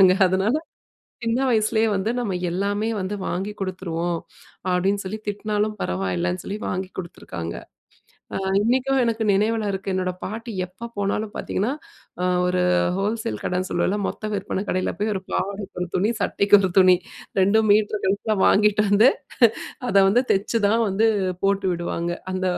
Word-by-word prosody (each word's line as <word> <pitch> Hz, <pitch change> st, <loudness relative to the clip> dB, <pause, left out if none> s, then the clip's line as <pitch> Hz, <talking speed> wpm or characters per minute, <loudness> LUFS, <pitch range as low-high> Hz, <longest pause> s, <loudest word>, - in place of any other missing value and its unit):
விடமாட்டாங்க. 185 Hz, -1 st, +8 dB
அதுனால 190 Hz, +6 st, +1 dB, 0.7 s
சின்ன 230 Hz, +1 st, +1 dB
வயசிலயே 220 Hz, -1 st, +2 dB
வந்து 195 Hz, +2 st, 0 dB
நாம 220 Hz, -6 st, -1 dB, 0.2 s
எல்லாமே 200 Hz, +4 st, -1 dB
வந்து 185 Hz, +2 st, -3 dB
வாங்கி 195 Hz, +4 st, -2 dB
குடுத்துருவோம் 175 Hz, -3 st, -2 dB, 0.5 s
அப்டினு 195 Hz, +3 st, +1 dB
சொல்லி, 200 Hz, +3 st, -4 dB
திட்டுனாலும் 210 Hz, +1 st, -1 dB
பரவாயில்லன்னு 90 Hz, -1 st, -1 dB
சொல்லி 200 Hz, -, -4 dB
வாங்கி 185 Hz, +1 st, -2 dB
குடுத்துருக்காங்க. 85 Hz, -, -6 dB, 0.8 s
அ -, -, -1 dB, 0.2 s
இன்னிக்கும் 260 Hz, +4 st, +2 dB
எனக்கு 230 Hz, -1 st, 0 dB
நினைவில 215 Hz, +2 st, +1 dB
இருக்கு. 195 Hz, 0 st, -3 dB
என்னோட 185 Hz, -1 st, -1 dB
பாட்டி 225 Hz, +3 st, -5 dB
எப்ப 195 Hz, +6 st, -9 dB
போனாலும் 205 Hz, +1 st, -1 dB
பார்த்தீங்கன்னா, 215 Hz, +7 st, -1 dB, 0.5 s
அ -, -, +1 dB, 0.2 s
ஒரு 180 Hz, 0 st, +1 dB, 0.3 s
ஹோல்சேல் 200 Hz, -, -2 dB
கடைன்னு 180 Hz, +1 st, -1 dB
சொல்லுவோம்ல, 200 Hz, +3 st, +1 dB
மொத்த 215 Hz, -, -5 dB
விற்பனை 195 Hz, -1 st, -2 dB
கடையில 185 Hz, 0 st, 0 dB
போய் 215 Hz, +1 st, +1 dB
ஒரு 190 Hz, -, -3 dB
பாவாடைக்கு 200 Hz, 0 st, -3 dB
1 180 Hz, -, -3 dB
துணி, 200 Hz, +4 st, +2 dB
சட்டைக்கு 200 Hz, +1 st, +4 dB
1 190 Hz, -1 st, 0 dB
துணி, 185 Hz, -1 st, +7 dB, 0.4 s
2 200 Hz, +4 st, +4 dB
மீட்டரு 210 Hz, 0 st, +3 dB
கணக்குல 205 Hz, +3 st, 0 dB
வாங்கிட்டு 210 Hz, 0 st, +4 dB
வந்து 215 Hz, +6 st, +6 dB, 0.8 s
அத 200 Hz, -, +1 dB
வந்து 235 Hz, +6 st, +4 dB
தைச்சு 210 Hz, +4 st, 0 dB
தான் 225 Hz, +3 st, +2 dB
வந்து 210 Hz, +4 st, +2 dB, 0.4 s
போட்டு 195 Hz, -1 st, +2 dB
விடுவாங்க. 170 Hz, 0 st, -3 dB, 0.2 s
அந்த 185 Hz, 0 st, -2 dB
200 Hz, 150 wpm, -23 LUFS, 185-215 Hz, 0.8 s, விடமாட்டாங்க